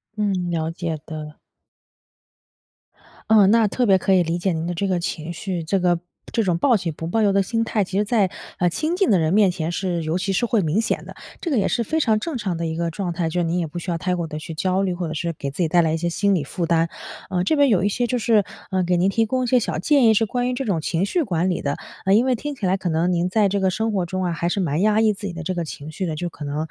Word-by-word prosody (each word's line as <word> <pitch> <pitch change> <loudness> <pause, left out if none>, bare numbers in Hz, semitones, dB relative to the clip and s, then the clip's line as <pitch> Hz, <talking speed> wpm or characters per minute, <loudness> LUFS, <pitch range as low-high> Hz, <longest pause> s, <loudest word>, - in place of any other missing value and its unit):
嗯， 195 -4 -1
了 160 -1 -1
解 165 -2 -4
的。 155 -1 -7 1.9
嗯， 205 -3 +6
那 225 -1 +4
特 245 +4 0
别 195 -2 +5
可 195 +1 +1
以 180 -2 +5
理 165 +1 -1
解 180 0 0
您 160 0 -3
的 175 - -2
这 195 +4 -1
个 180 -2 +1
情 170 -1 -4
绪。 175 0 -4
这 190 +4 0
个 175 -1 +2 0.3
这 230 - +2
种 180 -3 +1
报 250 +6 +3
喜 175 -4 -3
不 165 +2 -6
报 220 +7 +1
忧 205 -2 +4
的 195 - +4
心 230 +4 -1
态， 215 -2 +1
其 195 +1 -4
实 210 - +3
在， 205 -4 +2 0.3
呃， 175 - +2
亲 310 - -1
近 390 - +2
的 195 - +5
人 160 +1 +1
面 205 -2 +5
前 170 -2 -3
是 175 -1 -2
尤 160 +3 -1
其 195 +1 -1
是 215 - +1
会 230 -2 +2
明 170 +5 +1
显 - - -2
的， - - -9 0.3
这 340 - -3
个 265 - +2
也 205 - +2
是 235 - 0
非 315 +8 0
常 220 -5 +2
正 310 +3 -3
常 195 -7 -2
的 170 - -2
一 160 0 -2
个 170 0 -1
状 180 0 -3
态。 170 -1 -1
就 175 +2 -1
是 - - +1
您 170 +2 0
也 170 - 0
不 175 +3 -6
需 175 - -4
要 170 - -1
太 180 +2 -1
过 170 -2 -3
地 150 - -6
去 160 - -7
焦 185 +4 0
虑， 185 -2 0
或 175 -1 -3
者 155 - -4
是 170 +2 -2
给 140 -3 -5
自 160 - -4
己 - - +2
带 175 +2 +4
来 160 -1 +1
一 - - 0
些 170 +1 -1
心 200 +3 +1
理 160 - 0
负 170 +5 -3
担。 165 0 +2 0.4
呃， 180 -1 0
这 310 - +2
边 285 -1 +5
有 190 -6 +3
一 - - +3
些 245 +4 0
就 250 +2 0
是， 220 -3 +3 0.3
呃， 185 -1 +1
给 180 0 +1
您 180 +3 +3
提 225 +3 +2
供 255 +3 -1
一 - - -3
些 250 - +4
小 210 - -2
建 280 - +3
议， 220 - +6
是 225 +1 +3
关 245 +3 -1
于 250 - -1
这 270 +1 -3
种 175 -7 0
情 170 +4 0
绪 340 - 0
管 180 - 0
理 180 - -1
的， 140 0 -1 0.4
因 230 +5 +4
为 255 - +2
听 290 +4 -5
起 205 - -4
来 185 +1 +2
可 185 -2 -3
能 165 +2 +1
您 175 +1 +1
在 210 +1 +3
这 200 +1 0
个 190 - +3
生 220 +4 -1
活 185 -3 0
中 185 +2 -3
啊， 175 - 0
还 170 +1 -1
是 200 - -1
蛮 160 -3 0
压 215 +1 +3
抑 220 -1 +4
自 205 0 -6
己 180 - -5
的 170 0 -6
这 185 - -2
个 170 - -1
情 150 0 -8
绪 185 +4 -3
的。 160 -2 -3
就 175 +1 -2
可 150 - -10
能， 145 0 -3
185 Hz, 330 characters per minute, -22 LUFS, 170-215 Hz, 1.9 s, 嗯